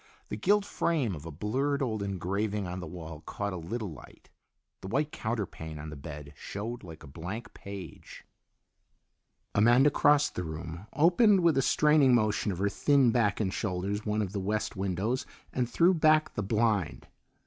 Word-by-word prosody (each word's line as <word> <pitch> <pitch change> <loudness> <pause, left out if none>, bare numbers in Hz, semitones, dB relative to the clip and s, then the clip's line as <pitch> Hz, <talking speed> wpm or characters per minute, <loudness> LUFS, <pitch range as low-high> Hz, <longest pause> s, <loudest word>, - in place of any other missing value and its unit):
The - - -3
gilt 200 - +2
frame 150 - 0
of 80 -1 -8
a - - -6
blurred 135 - -1
old 110 -5 -2
engraving 100 +2 -2
on 90 +1 -5
the 90 - -6
wall 80 -2 -8
caught 100 -1 -3
a - - -4
little 100 +4 -4
light. 75 - -14 0.5
The - - -7
white 145 +8 0
counterpane 100 -9 -4
on 75 +1 -7
the - - -7
bed 70 +1 -9
showed 110 - -6
like 80 -3 -11
a - - -10
blank 95 - -7
page. 100 -6 -10 1.3
Amanda 120 +7 +5
crossed 145 +1 +4
the 90 - -3
room, 80 +4 -7
opened 185 +5 +5
with 170 -2 +4
a 135 - +3
straining 150 -2 +4
motion 110 -2 +1
of 90 - -4
her 100 +3 +1
thin 130 +4 +3
back 105 -4 +1
and 95 -3 0
shoulders 100 +1 -2
one 105 0 0
of 95 - -4
the 100 - -1
west 105 +3 -2
windows, 100 +6 -1 0.3
and 125 -2 0
threw 175 +8 +4
back 155 -2 +3
the - - -2
blind. 105 -4 0
105 Hz, 175 wpm, -29 LUFS, 90-130 Hz, 1.3 s, Amanda